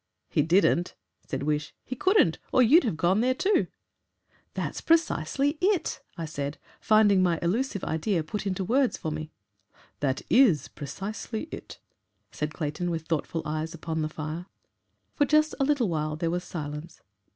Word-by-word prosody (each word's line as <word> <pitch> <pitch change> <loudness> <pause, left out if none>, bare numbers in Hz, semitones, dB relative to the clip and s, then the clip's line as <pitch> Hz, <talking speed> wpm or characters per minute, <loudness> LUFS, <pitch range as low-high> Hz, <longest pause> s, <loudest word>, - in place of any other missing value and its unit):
"He - - +3
didn't," 175 +2 +3 0.3
said 135 -1 -3
Wish; 150 +1 -1
"he 255 - -5
couldn't. 380 - +3
Or 255 - +5
you'd 280 +7 +6
have 205 -9 -1
gone 185 +5 +3
there 255 +1 +2
too." 400 +9 +2 0.9
"That's - - -3
precisely 290 - +1
it," 380 -1 +1 0.2
I 165 - -3
said, 145 -1 -4 0.2
finding 210 -3 +5
my 175 -2 +2
elusive 205 +3 0
idea 160 +2 0
put 205 +6 -4
into 190 0 -1
words 255 +6 +2
for 155 - -4
me. 155 0 -5 0.7
"That 135 -2 -1
IS 235 - +4
precisely 200 - -5
it," - - -8 0.5
said 150 0 -3
Clayton, 155 +3 -3
with 165 -2 -3
thoughtful 165 0 -2
eyes 155 +2 -3
upon 160 -1 -3
the 155 - -1
fire. 155 +3 -5 0.7
For 290 - +2
just 305 +2 +3
a 275 - +3
little 280 -5 +2
while 155 -3 -1
there 165 +1 -1
was 180 +1 -2
silence. 150 0 -7
175 Hz, 160 wpm, -27 LUFS, 155-240 Hz, 0.9 s, you'd